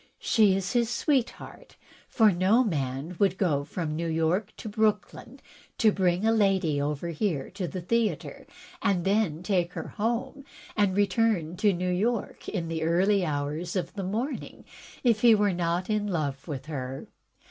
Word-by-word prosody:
She 210 -4 +3
is 190 -1 -2
his 235 -2 +2
sweetheart, 280 - -2 0.3
for 220 -4 +4
no 190 +7 +3
man 145 - -3
would 195 -2 +2
go 150 -8 +1
from 155 +1 -4
New 170 +1 -2
York 165 +6 0
to - - -8
Brooklyn 215 0 -1 0.4
and 215 -2 +6
bring 180 +1 +1
a 225 - +4
lady 190 -9 +2
over 150 +3 -2
here 165 -4 -2
to 185 -1 -4
the 185 - -5
theatre, 230 +5 -1 0.3
and 180 -4 +1
then 195 -5 +1
take 180 -3 0
her - - -6
home, 240 +6 -2 0.3
and 200 -2 +2
return 200 -4 +1
to 205 +2 +3
New 180 0 -1
York 215 +5 -2
in 175 -5 -3
the 165 -1 -3
early 185 +5 +2
hours 155 +3 -3
of 175 0 -3
morning, 210 +8 -4 0.4
if 230 -4 +3
he 235 -2 +7
were 205 -2 +2
not 175 +1 -1
in 210 -1 0
love 145 -7 -3
with 140 -4 -5
her. 135 -3 -5
185 Hz, 160 wpm, -27 LUFS, 165-215 Hz, 0.4 s, he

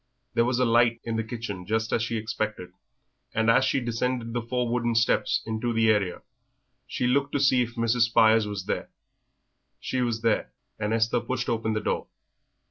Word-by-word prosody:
There 115 - +3
was 125 0 0
a 125 - +3
light 115 0 +3
in 115 -1 -3
the 110 - 0
kitchen 110 -5 -6
just 110 +1 -1
as - - +2
she 115 0 -2
expected, 110 -4 -4 0.6
and 115 +1 +3
as 130 - +4
she 130 +1 +1
descended 120 0 -2
the 120 - -1
four 125 +1 -2
wooden 120 -1 0
steps 115 - +2
into 110 +2 -2
the 110 -1 +4
area 100 -4 -1 0.6
she - - -2
looked 140 +3 +1
to 145 - +1
see 130 -2 +4
if 120 0 -3
Mrs. 115 +1 +1
Spires 110 -1 +4
was 100 -2 -5
there. - - -3 0.9
She 130 - -2
was 115 -2 -1
there, 115 -2 0 0.3
and 105 +1 -1
Esther 115 +1 +2
pushed 125 +1 -3
open 110 -1 -1
the 110 - -1
door. - - -2
115 Hz, 190 wpm, -26 LUFS, 110-120 Hz, 0.9 s, as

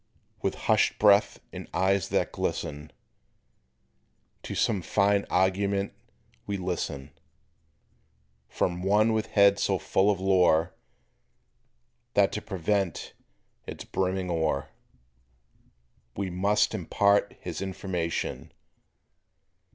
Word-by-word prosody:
With - - -1
hushed - - +3
breath 105 0 +4
and - - -7
eyes 95 +1 +1
that - - 0
glisten, 75 +1 -4 1.5
To - - -6
some 105 -5 +1
fine 100 +2 +1
argument 100 +2 +1 0.5
we 100 -1 -2
listen, 85 -7 -4 1.4
From 90 0 -1
one 105 +4 +3
with 110 0 -1
head 100 -2 +4
so - - +1
full 95 +2 +1
of 100 -3 +1
lore 90 -3 +3 1.4
That 100 -1 +4
to 105 - -4
prevent 95 -2 -2 0.5
its - - -7
brimming 95 -1 -2
o'er 80 -4 -1 1.5
He 95 -2 -3
must 100 +5 +1
impart 100 +1 +1
his 85 -2 -6
information. 95 -3 -4
95 Hz, 95 wpm, -27 LUFS, 90-100 Hz, 1.5 s, breath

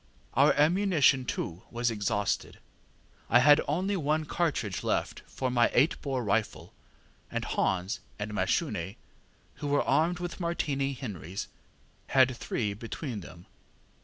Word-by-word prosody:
Our - - +5
ammunition, 155 -5 +3
too, 90 -6 -4
was 120 0 0
exhausted; 105 -1 -1 0.7
I 120 - +6
had 145 +4 +7
only 185 +7 0
one 155 -2 0
cartridge 140 - -1
left - - -1
for 130 -1 -3
my 120 -1 +4
eight 140 +7 +3
bore 135 -3 -2
rifle, 105 +1 -1 0.6
and - - -3
Hans 95 +1 0 0.2
and 105 0 -4
Mashune, 95 -2 -1 0.6
who 145 - -4
were 145 0 +2
armed 170 +3 +2
with 175 +1 -5
Martini 140 -5 -1
Henrys, 95 - -6 0.6
had 130 -1 +4
three 105 -3 -2
between 115 +3 -5
them. 85 0 -12
130 Hz, 130 wpm, -29 LUFS, 105-150 Hz, 0.7 s, had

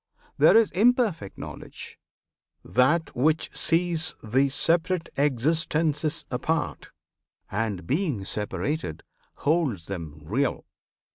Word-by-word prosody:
There - - +7
is 225 -2 +4
imperfect 210 - +2
Knowledge: - - -9 0.7
that 150 +7 +2
which 155 +5 +1
sees 165 -1 +1
The 130 +6 +2
separate 170 +4 +1
existences 150 +3 +1
apart, 160 +6 -2 0.6
And, 105 -3 -2
being 140 - -1
separated, 105 - -3 0.3
holds 145 - 0
them 80 -6 -6
real. 120 - -1
150 Hz, 90 wpm, -26 LUFS, 110-165 Hz, 0.7 s, There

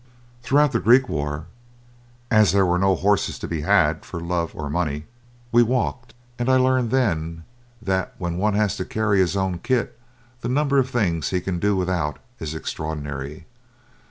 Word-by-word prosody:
Throughout 145 +3 +3
the 115 - +1
Greek 125 +4 +5
war, 75 -1 -3 0.9
as 110 -5 +5
there 100 -1 +4
were 90 0 +1
no 95 0 +3
horses 100 +3 +1
to - - -6
be 80 -3 -3
had - - +2
for 85 - -7
love 85 0 -2
or 75 - -4
money, 75 -1 -2 0.5
we 120 - +6
walked, 120 0 -1 0.2
and 120 +1 0
I 130 - +5
learned 130 -2 +2
then 85 -10 0 0.4
that 95 -2 -1
when 85 -1 -3
one 105 +1 +1
has 105 -2 +1
to - - -2
carry 110 -2 +1
his 95 +1 +2
own 95 -2 -1
kit 120 +1 -1 0.4
the 120 - -4
number 140 +1 +2
of 130 -1 +1
things 95 -10 0
he 90 - 0
can 90 -1 -3
do 105 +2 +2
without 90 -5 -1 0.2
is 80 0 -5
extraordinary. 75 -2 -5
95 Hz, 175 wpm, -23 LUFS, 80-120 Hz, 0.9 s, we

